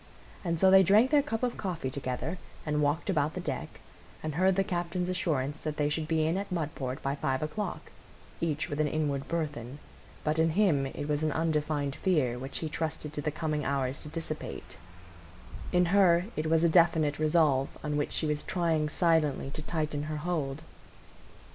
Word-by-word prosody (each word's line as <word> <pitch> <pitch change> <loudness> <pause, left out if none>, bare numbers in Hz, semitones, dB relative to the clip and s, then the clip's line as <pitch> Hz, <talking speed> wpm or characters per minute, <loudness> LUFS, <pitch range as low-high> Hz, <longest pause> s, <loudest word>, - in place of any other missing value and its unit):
And 170 -3 -1
so 190 +1 +6
they 190 0 +9
drank 210 +8 +5
their 295 -1 +6
cup 255 -5 -3
of 245 -1 0
coffee 170 -9 -3
together, 135 +6 -3 0.3
and 150 -1 0
walked 145 +3 +1
about 155 -5 +1
the - - -3
deck, - - -5 0.4
and 155 -1 -2
heard 185 +4 +3
the 195 - +3
captain's 175 0 -2
assurance 155 -5 -1
that 155 -1 -3
they 150 -1 +1
should 155 +1 -2
be 160 -1 +2
in 165 +4 +1
at 200 0 -4
Mudport 145 -6 -3
by 135 - 0
five 140 -1 -1
o'clock, 205 +7 -4 0.5
each 160 -2 -1
with 145 -3 -4
an 155 - +3
inward 145 -2 -1
burthen; 145 -6 -3 0.5
but 155 +1 0
in 165 0 +4
him 155 -10 +3
it 145 +2 -5
was 150 0 0
an 155 -1 +1
undefined 150 -3 0
fear, 135 -10 +1
which 135 +2 -5
he 160 - -3
trusted 155 -1 -3
to 150 - -3
the 150 - -1
coming 150 0 -2
hours 135 -1 -1
to 150 - -8
dissipate; 155 - -6 0.9
in 180 0 +4
her 180 -3 +5
it 155 +1 -1
was 160 +1 +3
a - - +6
definite 160 -3 +4
resolve 155 -4 +3
on 150 -1 -1
which 145 - -1
she - - -1
was 150 -1 0
trying 165 -4 0
silently 155 -5 +1
to 155 - -3
tighten 155 -2 -2
her 155 0 -3
hold. 150 -3 -2
155 Hz, 190 wpm, -30 LUFS, 145-170 Hz, 0.9 s, they